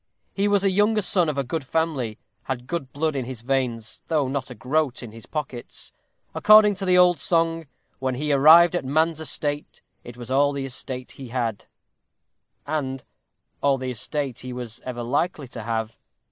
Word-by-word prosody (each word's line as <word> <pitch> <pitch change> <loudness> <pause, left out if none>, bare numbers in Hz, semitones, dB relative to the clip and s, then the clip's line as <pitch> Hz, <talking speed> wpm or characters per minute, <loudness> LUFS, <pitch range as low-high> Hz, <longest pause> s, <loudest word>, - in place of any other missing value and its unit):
He 200 +1 +1
was 200 -1 +2
a 195 - +3
younger 210 +2 +2
son 180 -4 +3
of 145 - -3
a 140 - +1
good 150 +4 -3
family; 135 -7 -1 0.3
had 125 -2 -4
good 135 -2 -4
blood 155 +1 -1
in 130 -3 -2
his 125 -2 -6
veins, 120 -3 -2
though 150 -4 +1
not 135 -1 -3
a 125 - -8
groat 130 +2 -1
in 115 - -8
his 115 0 -12
pockets. 140 -6 -6 0.4
According 215 0 +7
to 195 - -3
the 180 -1 +4
old 180 -1 +5
song 165 -2 +1 0.3
When 130 -1 -1
he 150 +3 0
arrived 160 +5 +7
at 175 - -1
man's 160 +4 +1
estate, 145 -2 -2 0.2
It 120 0 -11
was 120 +1 -8
all 140 +2 +3
the 140 -1 -3
estate 130 -1 -5
he 135 - -10
had; 115 -3 -3 1.0
and 135 -3 -3 0.6
all 140 -1 +3
the 130 0 -4
estate 135 +2 -3
he 130 - -7
was 120 -2 -6
ever 120 -2 -4
likely 145 +4 -1
to 120 - -7
have. 110 0 -3
140 Hz, 185 wpm, -24 LUFS, 125-160 Hz, 1.0 s, According